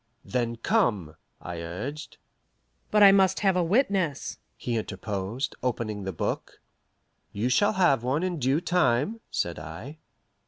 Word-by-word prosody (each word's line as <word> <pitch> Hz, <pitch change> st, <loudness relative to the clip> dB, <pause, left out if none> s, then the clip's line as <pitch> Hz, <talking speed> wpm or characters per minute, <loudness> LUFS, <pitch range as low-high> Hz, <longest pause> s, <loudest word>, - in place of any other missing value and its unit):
"Then 120 Hz, -2 st, -1 dB
come," 115 Hz, -, 0 dB, 0.2 s
I 85 Hz, -1 st, -6 dB
urged. 130 Hz, -, -6 dB, 0.7 s
"But 210 Hz, -1 st, +5 dB
I 200 Hz, -, +10 dB
must 190 Hz, -1 st, +3 dB
have 195 Hz, -3 st, +3 dB
a 180 Hz, -, +2 dB
witness," 185 Hz, -, 0 dB, 0.2 s
he 120 Hz, -, -3 dB
interposed, 105 Hz, +3 st, -3 dB
opening 110 Hz, -5 st, -2 dB
the 95 Hz, -, -2 dB
book. 80 Hz, -, -4 dB, 0.7 s
"You 110 Hz, +5 st, -1 dB
shall 205 Hz, +12 st, +3 dB
have 175 Hz, -, +3 dB
one 130 Hz, +7 st, 0 dB
in 180 Hz, -3 st, -2 dB
due 135 Hz, +5 st, +1 dB
time," 175 Hz, -, +1 dB
said 85 Hz, -2 st, -2 dB
I. 85 Hz, -, -9 dB
130 Hz, 140 wpm, -27 LUFS, -, 0.7 s, I